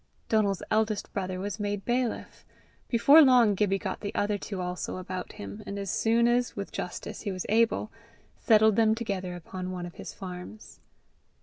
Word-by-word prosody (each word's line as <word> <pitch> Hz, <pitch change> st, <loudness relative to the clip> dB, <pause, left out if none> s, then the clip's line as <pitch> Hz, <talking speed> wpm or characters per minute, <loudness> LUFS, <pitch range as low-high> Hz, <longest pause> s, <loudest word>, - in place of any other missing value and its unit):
Donal's 205 Hz, -4 st, +1 dB
eldest 215 Hz, -1 st, 0 dB
brother 185 Hz, -2 st, -3 dB
was 205 Hz, +2 st, -4 dB
made 205 Hz, -1 st, -3 dB
bailiff. 245 Hz, -1 st, -2 dB, 0.4 s
Before 280 Hz, +6 st, +7 dB
long 250 Hz, -6 st, +6 dB
Gibbie 195 Hz, 0 st, +1 dB
got -, -, -4 dB
the 200 Hz, -, -5 dB
other 205 Hz, 0 st, +1 dB
two 200 Hz, -1 st, -5 dB
also 180 Hz, 0 st, -4 dB
about 185 Hz, 0 st, -6 dB
him, 100 Hz, +1 st, -8 dB
and 200 Hz, -, -4 dB
as 200 Hz, -1 st, -3 dB
soon 230 Hz, +1 st, +3 dB
as, 245 Hz, +1 st, +1 dB
with 200 Hz, -1 st, -5 dB
justice, 180 Hz, -, -6 dB
he 205 Hz, -, -3 dB
was 185 Hz, -1 st, -4 dB
able, 225 Hz, 0 st, +2 dB, 0.5 s
settled 220 Hz, -3 st, +4 dB
them 220 Hz, -1 st, +4 dB
together 195 Hz, -6 st, -3 dB
upon 185 Hz, +2 st, -6 dB
one 180 Hz, -1 st, -5 dB
of 175 Hz, -, -9 dB
his -, -, -7 dB
farms. 185 Hz, +3 st, -9 dB
205 Hz, 175 wpm, -28 LUFS, 185-225 Hz, 0.5 s, Before